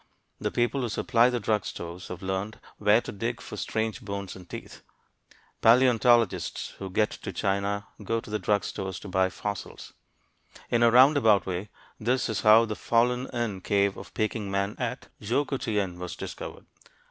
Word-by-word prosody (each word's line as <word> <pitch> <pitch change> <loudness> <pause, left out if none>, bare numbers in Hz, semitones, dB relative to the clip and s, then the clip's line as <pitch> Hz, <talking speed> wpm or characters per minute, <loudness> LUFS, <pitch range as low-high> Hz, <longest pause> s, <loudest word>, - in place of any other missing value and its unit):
The - - -1
people 120 +3 0
who 120 - -1
supply 115 +2 +3
the 125 -1 -1
drug 105 -1 0
stores 85 +1 -7
have 90 +1 -8
learned 95 +3 -3 0.2
where 105 +2 +4
to - - -7
dig 115 +4 -3
for - - -8
strange 110 +2 -2
bones 100 -3 -5
and 90 -2 -13
teeth. - - -9 0.8
Paleontologists 120 -2 +4
who 95 - -5
get 105 +3 +1
to - - -6
China 100 +1 -1 0.2
go 115 +3 0
to 110 - -11
the 105 - -1
drug 100 +2 +1
stores 95 -2 -4
to - - -8
buy 95 0 +2
fossils. 100 +1 -6 0.8
In 120 - +3
a 120 - +7
roundabout 125 - +6
way, 95 +2 -4 0.3
this 125 +3 0
is 110 - -1
how 110 +2 +7
the 110 -1 -4
fallen 125 +3 +1
in 110 -6 -3
cave 100 0 +1
of - - -10
Peking 110 -1 -1
man 100 +1 -1
at - - -4
Choukoutien 105 -6 -1
was 90 -1 -5
discovered. - - -7
105 Hz, 170 wpm, -27 LUFS, 100-120 Hz, 0.8 s, a